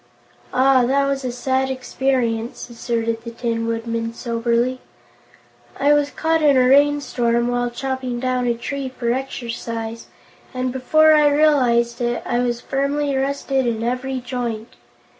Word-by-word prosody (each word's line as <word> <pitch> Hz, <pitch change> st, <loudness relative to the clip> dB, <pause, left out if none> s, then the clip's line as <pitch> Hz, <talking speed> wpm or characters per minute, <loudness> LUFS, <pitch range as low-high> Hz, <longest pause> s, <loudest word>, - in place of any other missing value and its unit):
"Ah, 260 Hz, 0 st, +4 dB
that 275 Hz, +1 st, +2 dB
was 275 Hz, -1 st, -1 dB
a 250 Hz, -, -2 dB
sad 260 Hz, +2 st, -1 dB
experience," 255 Hz, -3 st, -2 dB
asserted 230 Hz, -1 st, -2 dB
the 235 Hz, -, -6 dB
Tin 230 Hz, -1 st, -2 dB
Woodman 230 Hz, 0 st, -3 dB
soberly. 235 Hz, +2 st, -1 dB, 1.0 s
"I 285 Hz, +2 st, +4 dB
was 290 Hz, -1 st, +2 dB
caught 320 Hz, +2 st, 0 dB
in 285 Hz, -3 st, +5 dB
a 250 Hz, -1 st, +4 dB
rainstorm 255 Hz, -4 st, +2 dB
while 245 Hz, 0 st, 0 dB
chopping 255 Hz, 0 st, -4 dB
down 255 Hz, 0 st, 0 dB
a 235 Hz, -, +1 dB
tree 275 Hz, +3 st, -4 dB
for 240 Hz, -2 st, -2 dB
exercise, 230 Hz, -3 st, -5 dB, 0.5 s
and 255 Hz, 0 st, -2 dB
before 310 Hz, +4 st, +4 dB
I 300 Hz, -1 st, +5 dB
realized 250 Hz, -6 st, +2 dB
it, 240 Hz, 0 st, -1 dB
I 240 Hz, -, 0 dB
was 240 Hz, -1 st, -1 dB
firmly 280 Hz, +1 st, -1 dB
rusted 270 Hz, -1 st, 0 dB
in 225 Hz, -1 st, -1 dB
every 255 Hz, +2 st, -2 dB
joint. 240 Hz, -3 st, -5 dB
250 Hz, 140 wpm, -21 LUFS, 235-270 Hz, 1.0 s, in